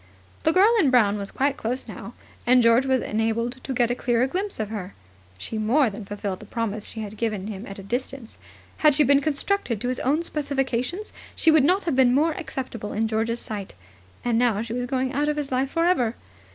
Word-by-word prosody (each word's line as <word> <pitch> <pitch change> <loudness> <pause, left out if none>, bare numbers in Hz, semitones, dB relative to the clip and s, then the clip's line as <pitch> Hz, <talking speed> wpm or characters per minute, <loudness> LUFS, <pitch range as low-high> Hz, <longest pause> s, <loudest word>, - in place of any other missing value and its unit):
The 320 - +3
girl 390 +6 +5
in 300 - +4
brown 210 -5 +3
was 200 0 -4
quite 275 +1 0
close 245 +4 -3
now, - - -9 0.3
and 250 0 +6
George 230 +3 +4
was 260 -2 +2
enabled 230 +4 -1
to - - -5
get 245 -2 +1
a - - +2
clearer 240 0 +1
glimpse 380 - -3
of 215 -2 -2
her. 200 -3 -6 0.4
She 215 - -5
more 235 +3 +3
than 205 +1 -8
fulfilled 200 -2 -4
the 215 - -12
promise 220 -2 -3
she 225 - -5
had 215 0 -7
given 210 -2 -3
at 195 - -8
a 195 - -9
distance. 245 +2 -5 0.4
Had 300 -2 +5
she 300 - +5
been 280 +1 +4
constructed 285 - -1
to 245 - -2
his 255 - -1
own 300 +6 +1
specifications, 280 - -2 0.2
she 325 - +4
would 310 -3 +5
not 370 +7 +3
have 325 -6 -1
been 255 -1 +4
more 315 +4 +3
acceptable 265 - -5
in 220 +1 0
George's 225 +2 -1
sight. 205 - -5 0.5
And 235 -1 +2
now 230 -4 +2
she 230 -1 -6
was 245 0 -2
going 260 0 -1
out 290 +2 +1
of 300 - -1
his 290 -2 -3
life 260 +1 0
for 330 +3 +1
ever. 250 -11 +2
245 Hz, 220 wpm, -24 LUFS, 220-280 Hz, 0.5 s, and